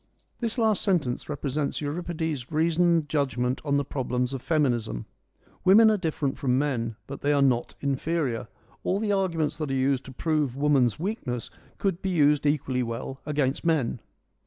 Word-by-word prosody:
This 230 Hz, 0 st, -2 dB
last 220 Hz, -4 st, +2 dB
sentence 155 Hz, -12 st, 0 dB
represents 145 Hz, 0 st, -2 dB
Euripides' 155 Hz, -3 st, -3 dB
reasoned 165 Hz, 0 st, +2 dB
judgment 130 Hz, -4 st, 0 dB
on 140 Hz, -2 st, +1 dB
the 140 Hz, -, 0 dB
problems 125 Hz, -1 st, -2 dB
of 135 Hz, -, -4 dB
feminism. 120 Hz, -, 0 dB, 0.6 s
Women 220 Hz, +4 st, +7 dB
are 215 Hz, -, +2 dB
different 155 Hz, -6 st, -2 dB
from 130 Hz, -2 st, +2 dB
men, 120 Hz, -6 st, -1 dB
but 140 Hz, -, -8 dB
they 145 Hz, -, +2 dB
are 145 Hz, -1 st, +3 dB
not 125 Hz, -3 st, +1 dB
inferior: 140 Hz, -3 st, -1 dB, 0.4 s
all 190 Hz, -, +1 dB
the 215 Hz, -1 st, 0 dB
arguments 170 Hz, -7 st, 0 dB
that 155 Hz, -3 st, -2 dB
are 135 Hz, -, 0 dB
used 135 Hz, 0 st, +1 dB
to 135 Hz, -, -9 dB
prove 150 Hz, -2 st, -1 dB
woman's 140 Hz, -5 st, +3 dB
weakness 160 Hz, -, -3 dB, 0.3 s
could 190 Hz, -3 st, -1 dB
be 190 Hz, -, -1 dB
used 150 Hz, -4 st, +3 dB
equally 135 Hz, -3 st, +1 dB
well 120 Hz, +3 st, -4 dB
against 145 Hz, -2 st, 0 dB
men. 150 Hz, -8 st, +1 dB
145 Hz, 160 wpm, -26 LUFS, 130-165 Hz, 0.6 s, Women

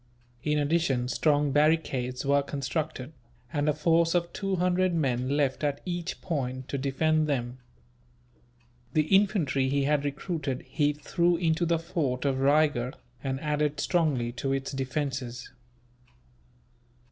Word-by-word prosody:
In 150 Hz, +3 st, 0 dB
addition, 145 Hz, -4 st, +1 dB
strong 145 Hz, 0 st, +2 dB
barricades 140 Hz, -4 st, +1 dB
were 140 Hz, +1 st, +4 dB
constructed, 140 Hz, 0 st, -4 dB, 0.4 s
and 145 Hz, 0 st, +1 dB
a -, -, +3 dB
force 165 Hz, +2 st, +2 dB
of 170 Hz, -1 st, 0 dB
two 195 Hz, -1 st, -1 dB
hundred 180 Hz, 0 st, +1 dB
men 130 Hz, -5 st, 0 dB
left, 140 Hz, -1 st, 0 dB
at 145 Hz, -1 st, 0 dB
each 175 Hz, -1 st, -4 dB
point, 130 Hz, -6 st, -3 dB
to 140 Hz, -, -2 dB
defend 155 Hz, +3 st, +1 dB
them. 125 Hz, -3 st, -2 dB, 1.3 s
The 155 Hz, -, +3 dB
infantry 175 Hz, -10 st, +2 dB
he 140 Hz, 0 st, +1 dB
had 145 Hz, 0 st, +2 dB
recruited 145 Hz, -2 st, -3 dB
he 150 Hz, -2 st, +1 dB
threw 170 Hz, +3 st, +1 dB
into 165 Hz, 0 st, +1 dB
the 170 Hz, 0 st, +2 dB
fort 155 Hz, -6 st, -2 dB
of 135 Hz, -1 st, +1 dB
Raygurh, 140 Hz, -3 st, +2 dB, 0.3 s
and 135 Hz, -1 st, -2 dB
added 150 Hz, -1 st, 0 dB
strongly 145 Hz, -9 st, +1 dB
to 130 Hz, +3 st, -3 dB
its 135 Hz, 0 st, -2 dB
defences. 135 Hz, -3 st, -3 dB
145 Hz, 135 wpm, -28 LUFS, 135-160 Hz, 1.3 s, were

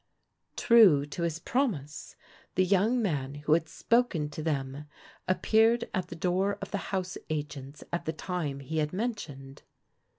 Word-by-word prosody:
True 200 Hz, -, +6 dB
to 145 Hz, +4 st, -6 dB
his 165 Hz, -2 st, -1 dB
promise 170 Hz, -, -2 dB, 0.4 s
the 185 Hz, -, +3 dB
young 210 Hz, +6 st, +2 dB
man 145 Hz, -7 st, -2 dB
who 150 Hz, +1 st, +1 dB
had 160 Hz, 0 st, +1 dB
spoken 170 Hz, -4 st, +1 dB
to 155 Hz, -, -6 dB
them 140 Hz, -2 st, -2 dB, 0.4 s
appeared 225 Hz, +5 st, +3 dB
at 185 Hz, -1 st, -1 dB
the 170 Hz, -, -8 dB
door 185 Hz, +4 st, 0 dB
of -, -, -7 dB
the 200 Hz, -, -1 dB
house 185 Hz, -2 st, -2 dB
agents 145 Hz, -2 st, -5 dB
at 175 Hz, -, -2 dB
the 160 Hz, -, -1 dB
time 155 Hz, -4 st, -3 dB
he 155 Hz, +4 st, -3 dB
had 150 Hz, +1 st, -1 dB
mentioned. 155 Hz, -, -5 dB
165 Hz, 155 wpm, -29 LUFS, 145-200 Hz, 0.4 s, True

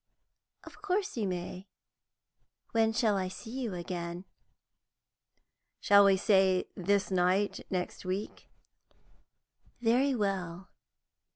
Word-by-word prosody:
"Of -, -, -14 dB
course 405 Hz, 0 st, -1 dB
you 220 Hz, -4 st, -1 dB
may. 180 Hz, +1 st, -5 dB, 1.0 s
When 225 Hz, -1 st, +3 dB
shall 220 Hz, -2 st, +1 dB
I 185 Hz, -1 st, -1 dB
see 220 Hz, +5 st, -9 dB
you 245 Hz, -6 st, -3 dB
again?" 175 Hz, 0 st, -5 dB, 1.5 s
"Shall 200 Hz, 0 st, +6 dB
we 195 Hz, -1 st, +5 dB
say 190 Hz, -2 st, +3 dB
this 200 Hz, +2 st, 0 dB
night 185 Hz, +2 st, +1 dB
next 180 Hz, -1 st, -3 dB
week?" 190 Hz, +3 st, -5 dB, 1.3 s
"Very 250 Hz, +4 st, +2 dB
well. 190 Hz, -4 st, -3 dB
195 Hz, 100 wpm, -30 LUFS, 185-225 Hz, 1.5 s, Shall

